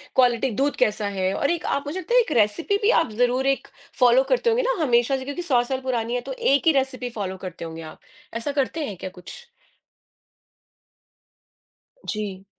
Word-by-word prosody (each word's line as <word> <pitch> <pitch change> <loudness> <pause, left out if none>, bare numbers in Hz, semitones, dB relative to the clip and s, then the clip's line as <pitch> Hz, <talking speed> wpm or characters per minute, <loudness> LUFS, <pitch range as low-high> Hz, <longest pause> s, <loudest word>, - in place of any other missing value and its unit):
Quality 250 0 +3
दूध 285 +1 +1
कैसा 210 -1 -1
है? 185 +1 0
और 280 - 0
एक 340 - -2
आप 280 - -1
मुझे 345 +6 -3
लगता 475 - -4
है - - +8
एक 445 - -5
रेसिपी 275 - +2
भी 415 - +3
आप 290 - -3
ज़रूर 250 +2 +2
एक - - -17 0.3
फॉलो 250 +1 +6
करते 485 -1 +2
होंगे 480 +2 +2
ना, - - 0
हमेशा 245 +1 +3
से 260 - -7
क्योंकि 285 +5 -4
100 255 -8 +2
साल 260 +1 -3
पुरानी 240 -2 -2
है 245 - -1
तो - - -3 0.2
एक 285 +3 +2
ही - - +8
रेसिपी 255 -2 -4
फॉलो 190 -1 -3
करते 170 -1 -8
होंगे 165 0 -7
आप। - - -30 0.3
ऐसा 230 +5 -2
करते 300 +3 -3
हैं 195 -4 -6
क्या 190 - -6
कुछ? 485 - -11 2.6
जी। 200 -3 -4
255 Hz, 195 wpm, -23 LUFS, 220-290 Hz, 2.6 s, है